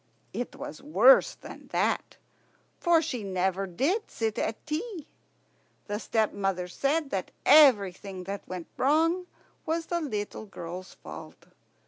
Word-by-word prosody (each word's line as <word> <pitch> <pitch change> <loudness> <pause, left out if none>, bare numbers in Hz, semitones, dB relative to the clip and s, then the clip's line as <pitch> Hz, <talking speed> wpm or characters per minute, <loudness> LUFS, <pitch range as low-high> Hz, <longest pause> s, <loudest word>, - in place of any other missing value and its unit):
It 245 - -4
was 155 - -8
worse 215 - +5
than - - -12
that, - - -1 0.6
for 335 -2 +4
she 260 -7 -3
never 190 0 -1
did 300 - 0
sit 220 -2 -2
at 220 - -3
tea. 320 +2 -4 0.8
The 205 0 -3
stepmother 195 -5 0
said 280 - 0
that 190 -2 -2 0.2
everything 200 -10 +5
that 195 +2 -6
went 180 -2 -5
wrong 330 +6 +2 0.4
was 330 +1 -1
the 345 0 -1
little 215 -6 -4
girl's 180 -1 -8
fault. - - -11
220 Hz, 125 wpm, -28 LUFS, 190-310 Hz, 0.8 s, worse